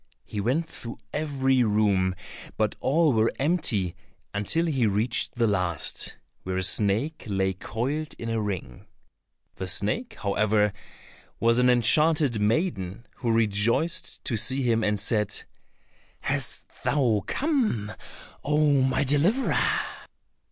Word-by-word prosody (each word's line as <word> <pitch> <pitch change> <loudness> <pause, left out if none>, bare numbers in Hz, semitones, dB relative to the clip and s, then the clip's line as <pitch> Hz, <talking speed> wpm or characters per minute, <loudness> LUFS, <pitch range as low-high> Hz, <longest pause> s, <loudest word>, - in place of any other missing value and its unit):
He 105 - -4
went 135 +10 0
through 115 -6 -8 0.2
every 135 -4 +1
room, 100 -4 +2 0.4
but 110 -1 0
all 155 +1 +2
were 110 0 +2
empty 130 - +1 0.4
until 105 +12 +1
he 135 -8 +1
reached 110 +6 +1
the 120 -1 +2
last, 90 -7 0 0.3
where 95 0 -3
a 95 - 0
snake 110 - +1
lay 95 -2 0
coiled 135 - -4
in 115 - -6
a 115 -1 -1
ring. 95 - -5 0.7
The 95 - -4
snake, 220 - -1
however, 105 0 +1 0.7
was 115 +1 +3
an 125 0 +4
enchanted 135 0 +3
maiden, 105 - -1
who 120 - -1
rejoiced 115 +8 +1
to 115 - -1
see 130 +5 +2
him, 115 -2 +1
and 105 -1 +1
said, 105 0 0 0.8
"Hast - - -1 0.2
thou 120 -8 +2
come, 240 - 0 0.5
oh, 150 -2 +3
my 130 +1 +2
deliverer? 155 - +2
115 Hz, 125 wpm, -26 LUFS, 105-145 Hz, 0.8 s, an